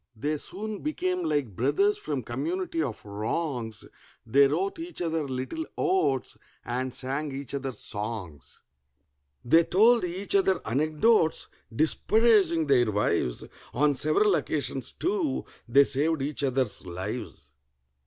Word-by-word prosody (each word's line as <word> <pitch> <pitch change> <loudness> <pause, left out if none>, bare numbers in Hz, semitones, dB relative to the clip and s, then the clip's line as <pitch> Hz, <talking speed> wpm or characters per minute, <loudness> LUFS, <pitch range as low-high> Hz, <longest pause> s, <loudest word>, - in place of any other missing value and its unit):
They 150 +7 -2
soon 210 +6 -6
became 365 +3 -1
like 135 - -1
brothers 150 - +2
from 145 -5 -3
community 165 - -2
of 125 -9 -4
wrongs: 110 +2 -3 0.4
They 140 +5 +5
wrote 185 - -1
each 340 +1 -7
other 160 -3 -1
little 130 - -3
odes 140 - 0 0.3
and 125 +2 -2
sang 135 +4 -4
each 135 -1 -6
other 135 -1 -3
songs; 105 - -7 0.8
They 165 +8 +6
told 225 +6 +4
each 180 +3 -1
other 190 -2 +3
anecdotes 155 - +2 0.2
disparaging 190 - +3
their 125 -6 +3
wives; 100 -11 0 0.3
On 145 +3 +3
several 155 +9 +3
occasions, 140 -5 -2
too, 355 -6 -1 0.2
they 140 +4 +7
saved 145 +2 +1
each 145 +1 -2
other's 130 -5 0
lives. 90 -5 -6
145 Hz, 125 wpm, -27 LUFS, 125-190 Hz, 0.8 s, they